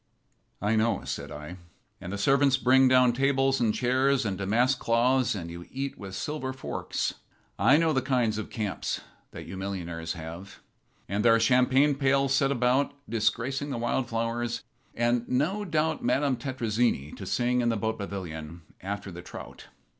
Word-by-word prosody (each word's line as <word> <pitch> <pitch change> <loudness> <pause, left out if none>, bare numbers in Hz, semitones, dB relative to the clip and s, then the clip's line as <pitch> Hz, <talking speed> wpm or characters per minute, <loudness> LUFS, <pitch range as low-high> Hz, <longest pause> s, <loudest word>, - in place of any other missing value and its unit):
"I 105 +2 +2
know," 110 +1 +1
said - - -5
I. 75 +5 -8 0.4
"And 90 - -6
the 100 - -3
servants 135 +5 +3
bring 130 0 +5
down 125 -1 +5
tables 135 +1 +2
and 115 -3 +2
chairs 130 +2 +2
and 100 -3 -1
damask 115 +7 +1
cloths, 120 +1 +2
and 85 -4 -5
you 85 0 -9
eat 135 +1 -4
with 95 -1 -8
silver 145 -1 -3
forks. 130 - -3 0.5
I 145 - +6
know 160 -1 +2
the 130 - +2
kind 125 -4 +1
of 110 - -6
camps 105 -4 -3 0.3
that - - -9
you 95 - -7
millionaires 85 -4 -4
have. 85 +4 -9 0.5
And 100 +2 -1
there 115 -1 +6
are - - +3
champagne 130 +4 +4
pails 135 0 +2
set 135 0 +3
about, 130 +2 +1
disgracing 115 +6 -1
the 135 - -3
wild 120 +2 -1
flowers, 115 +1 -2 0.3
and, 120 0 +1
no 160 +11 0
doubt, 160 -3 0
Madame 135 +2 +2
Tetrazzini 120 - -1
to - - -8
sing 125 0 +1
in 120 - +1
the 115 - 0
boat 110 +1 -2
pavilion 85 -5 -6 0.2
after 100 +1 -5
the 90 0 -8
trout." - - -10
120 Hz, 170 wpm, -28 LUFS, 100-135 Hz, 0.5 s, I